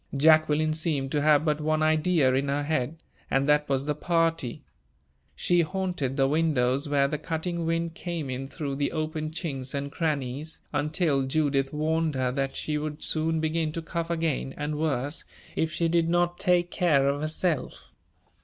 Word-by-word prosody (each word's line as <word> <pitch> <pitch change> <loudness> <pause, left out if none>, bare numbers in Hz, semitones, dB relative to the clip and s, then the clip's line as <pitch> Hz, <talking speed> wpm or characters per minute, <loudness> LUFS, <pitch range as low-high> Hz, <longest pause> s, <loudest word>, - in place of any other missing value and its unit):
Jacqueline 155 +1 +4
seemed 155 -4 -1
to 145 - +1
have 150 +1 +4
but 150 -1 +1
one 155 +1 +1
idea 155 -3 +3
in 135 +2 +1
her 140 +1 0
head, 155 +1 -2 0.3
and 135 +1 +1
that 150 0 +3
was 135 0 0
the 150 - 0
party. 165 -4 0 0.7
She 175 - +2
haunted 175 -6 -2
the 135 -1 +4
windows 145 -2 +1
where 140 -1 +3
the 150 +1 -3
cutting 165 +2 -3
wind 165 0 -1
came 170 -3 -4
in 130 +1 -4
through 140 -1 -4
the 140 0 -1
open 155 -1 -2
chinks 140 -5 -4
and 140 0 -3
crannies, 150 -2 -2
until 145 -2 +1
Judith 140 -2 +1
warned 155 0 0
her 130 -1 0
that 135 +1 -2
she 150 -1 -2
would 150 0 -5
soon 160 0 +1
begin 160 0 0
to 165 - -3
cough 170 0 -3
again, 160 -5 -1
and 150 0 -3
worse, 145 -2 -1 0.3
if 160 -1 0
she 170 +1 0
did 165 0 +2
not 175 0 +1
take 175 -1 +2
care 150 -6 +3
of 140 +1 0
herself. 155 -1 -2
155 Hz, 175 wpm, -27 LUFS, 140-165 Hz, 0.7 s, Jacqueline